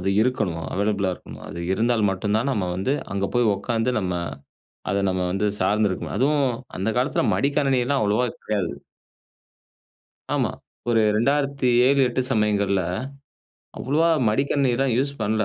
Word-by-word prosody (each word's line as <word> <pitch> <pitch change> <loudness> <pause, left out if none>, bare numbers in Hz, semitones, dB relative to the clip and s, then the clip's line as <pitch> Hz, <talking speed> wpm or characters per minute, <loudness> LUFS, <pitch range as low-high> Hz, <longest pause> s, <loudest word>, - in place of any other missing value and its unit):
அது 95 +2 0
இருக்கணும் 95 -10 -1
அவைலபிளா 100 -2 0
இருக்கணும். - - -12
அது 85 - -6
இருந்தால் 115 -1 +2
மட்டும் 100 +2 -2
தான், 130 +5 0
நம்ம 95 -7 -1
வந்து 130 +9 0 0.2
அங்க 100 0 0
போய் 120 -3 +3
உட்காந்து 115 +3 -1
நம்ம 90 -2 -2 0.8
அத 100 - +1
நம்ம 90 0 -1
வந்து 105 +2 0
சார்ந்து 105 0 +2
இருக்கணும். 95 - -4
அதுவும் 140 +1 +2 0.3
அந்த 95 - -1
காலத்தில 130 +3 +1
மடிக்கணினிலாம் 135 +2 +1
அவ்வளோவா 105 +4 +2 0.2
கெடையாது. 100 -5 -1 1.6
ஆமா. - - 0 0.4
ஒரு 115 -2 +4
2007, 135 0 +2
8 125 +1 -1
சமயங்கள்ல, 100 -3 +2 1.0
அவ்வளவா 155 +6 +2 0.2
மடிக்கணினில்லாம் 135 +1 +1
யூஸ் 140 +1 0
பண்ணல. 110 +1 +1
115 Hz, 130 wpm, -23 LUFS, 100-135 Hz, 1.6 s, ஒரு